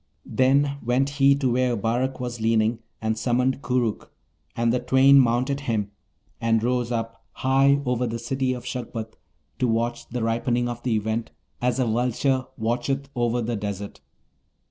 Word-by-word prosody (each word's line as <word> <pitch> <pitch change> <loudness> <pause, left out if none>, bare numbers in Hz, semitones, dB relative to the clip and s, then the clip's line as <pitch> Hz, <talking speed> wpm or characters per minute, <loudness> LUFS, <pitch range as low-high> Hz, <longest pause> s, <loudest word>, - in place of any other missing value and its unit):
Then 140 +2 +2
went 125 +4 +1
he 140 0 +6
to 135 -3 0
where 125 -1 +1
Abarak 120 +6 -1
was 120 -2 -5
leaning, 110 0 +2 0.2
and 110 0 +1
summoned 125 +2 +1
Koorookh, 120 -4 -1 0.5
and 115 0 +1
the 125 - +1
twain 135 +2 +6
mounted 130 +3 +2
him, 105 -3 -1 0.5
and 115 -1 +2
rose 125 0 0
up 115 -1 -4
high 135 +2 +3
over 125 0 0
the 115 0 -3
City 130 +2 -1
of 125 -1 -7
Shagpat 115 -3 -5 0.5
to 125 - +2
watch 120 +1 -1
the 120 -1 -3
ripening 120 +2 0
of 120 -1 -5
the 120 -3 0
Event, 110 +2 -2 0.3
as 125 -1 +1
a 130 - +2
vulture 125 +3 0
watcheth 125 +4 -1
over 120 0 0
the 120 +1 -2
desert. 100 -1 -5
120 Hz, 160 wpm, -24 LUFS, 115-130 Hz, 0.5 s, he